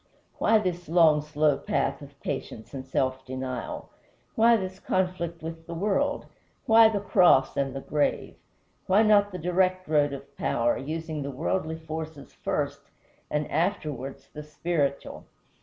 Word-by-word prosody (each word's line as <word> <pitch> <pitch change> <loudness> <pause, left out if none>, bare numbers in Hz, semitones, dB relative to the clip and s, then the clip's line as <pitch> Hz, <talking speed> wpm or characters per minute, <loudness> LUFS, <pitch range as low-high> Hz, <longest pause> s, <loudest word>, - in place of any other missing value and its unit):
Why 220 - +4
this 180 -4 -3
long, 160 -3 +5
slow 150 -1 +1
path - - -1
of - - -13
patience 110 - -5
and 135 -1 -5
self 130 0 -1
denial? 130 -1 -5 0.4
Why 230 +1 +5
this 190 -2 -5
conflict 180 -4 -2
with 165 0 -7
the 170 - -6
world? 210 +11 0 0.4
Why 225 0 +7
the 210 -2 -1
cross 180 -9 +4
and 135 -1 -1
the 135 - -4
grave? 145 +1 -1 0.5
Why 200 +4 +5
not 205 -1 +4
the 185 - -5
direct 185 +2 +1
road 145 -2 +3
of 140 0 -9
power, 120 -2 +1
using 155 +2 -4
the 140 - -4
worldly 160 +4 -2
forces 160 -3 -7
first, - - -2 0.5
and 150 0 -1
afterwards 150 -6 -2
the 150 - -7
spiritual?" 150 -2 -2
160 Hz, 145 wpm, -27 LUFS, 140-185 Hz, 0.5 s, Why